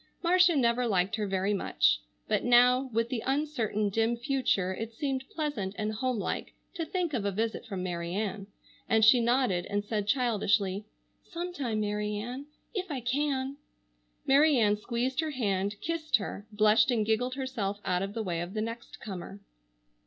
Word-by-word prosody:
Marcia 360 0 +5
never 245 -2 +2
liked 195 0 +1
her 210 -1 -1
very 195 +1 0
much, - - +2 0.3
but - - +1
now, 250 +2 +5
with 230 +1 0
the 240 -3 -2
uncertain, 265 -7 0
dim 225 +3 +1
future 235 -7 0
it 225 +4 -5
seemed 265 0 -2
pleasant 240 - -3
and 215 0 -2
home 250 +2 -1
like 205 - -3 0.2
to 350 -4 -3
think 345 -1 -2
of 235 -6 -1
a 200 - 0
visit 220 +4 -2
from 195 -4 -4
Mary 170 -2 -3
Ann 205 -1 -3 0.4
and 220 -1 +5
she 245 +3 +7
nodded 235 -7 +1
and 205 0 -2
said 210 -1 -2
childishly: 210 -5 +1 0.4
"Sometime, 335 -11 -3
Mary 210 0 -1
Ann, 250 +6 -6 0.3
if 380 -4 -3
I 280 -4 -2
can." 270 +2 -1 0.7
Mary 285 +1 +5
Ann 210 -3 +4
squeezed 240 +6 -2
her 320 -1 +1
hand, 205 -7 -1
kissed 330 -1 0
her, 205 -1 -3
blushed 215 +3 +4
and 225 -4 +2
giggled 245 +4 0
herself 230 -7 -3
out 180 -1 +1
of 195 +1 -4
the 225 - -1
way 170 -4 -2
of 175 +4 -6
the 215 - 0
next 230 +1 -6
comer. 195 -1 -7
225 Hz, 175 wpm, -29 LUFS, 205-265 Hz, 0.7 s, she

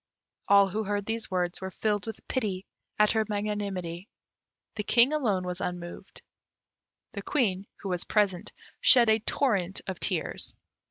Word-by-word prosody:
All 200 -1 +6
who 215 +3 -2
heard 205 0 -1
these 225 +1 -2
words 180 -1 -1
were 190 - -4
filled 205 +2 -1
with 225 - -8
pity 200 -6 -2 0.3
at 210 0 +4
her 220 -1 +2
magnanimity; 200 -4 -3 0.7
the 220 - -3
King 235 +6 +5
alone 215 -11 +1
was 180 0 -4
unmoved. 175 -1 -6 0.9
The 200 - -6
Queen, 200 -6 0
who 195 - -4
was 180 -1 -2
present, 200 -5 0 0.3
shed 240 -4 +6
a 220 0 +4
torrent 200 -6 0
of 190 -2 -5
tears. - - -1
205 Hz, 150 wpm, -28 LUFS, 185-220 Hz, 0.9 s, All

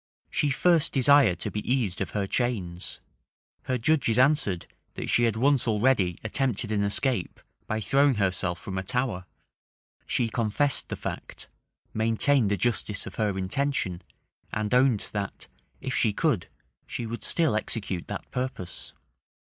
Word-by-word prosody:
She 145 - +1
first 165 +3 +3
desired 135 - +5
to - - -2
be 105 - -3
eased 115 -10 0
of 95 - -1
her 100 -2 -1
chains: 95 -6 -2 0.6
her 130 - 0
judges 125 -3 +2
answered, 130 - +3 0.3
that - - -3
she 120 - +4
had 115 -2 +1
once 135 +2 +2
already 105 -5 +2
attempted 110 -1 0
an 105 -1 +1
escape 100 0 0 0.3
by 110 - -1
throwing 140 +4 +3
herself 95 -3 0
from 95 +2 -4
a - - -4
tower: 105 -4 -1 0.8
she 120 - +1
confessed 115 +5 +1
the - - -2
fact, - - -7 0.4
maintained 115 +2 +3
the 100 - +1
justice 105 -1 -1
of 95 - -8
her 105 -3 0
intention, 95 -2 -1 0.5
and 110 +1 -2
owned 125 -4 +3
that, 100 -2 -4 0.4
if - - -3
she 105 - +2
could, 125 - 0 0.4
she 120 - -4
would 115 +1 -5
still 160 -9 +2
execute 100 -4 -3
that - - -7
purpose. 125 -8 -5
110 Hz, 150 wpm, -27 LUFS, 100-130 Hz, 0.8 s, desired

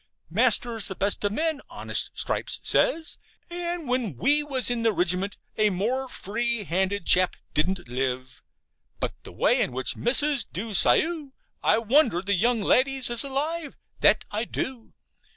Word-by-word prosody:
'Master's 230 -4 +2
the 190 - -4
best 200 +2 +1
of 205 - +1
men,' 315 +4 -1
honest - - 0
Stripes - - -2
says, 320 0 +1 0.3
'and 345 -2 -4
when 245 - -1
we 285 - +3
was 265 -4 -1
in 240 -1 -1
the 225 -1 +2
ridgment 180 +2 0 0.2
a 215 0 +4
more 240 +8 -2
free 235 +2 -1
handed 190 +1 -1
chap 185 0 +3 0.2
didn't 175 +4 -1
live. 130 +1 -3 0.6
But - - -2
the - - -11
way - - +2
in - - 0
which 130 +1 -1
Missus 275 +1 +2
DU 200 +4 -6
scryou, 305 - +3 0.3
I 220 - +3
wonder 230 - +2
the 200 +1 0
young 230 +4 +1
ladies 265 +2 +2
is 235 -1 +1
alive, 295 +3 -3 0.2
that - - +3
I - - -2
du!' 255 -3 -5
230 Hz, 155 wpm, -25 LUFS, 190-275 Hz, 0.6 s, a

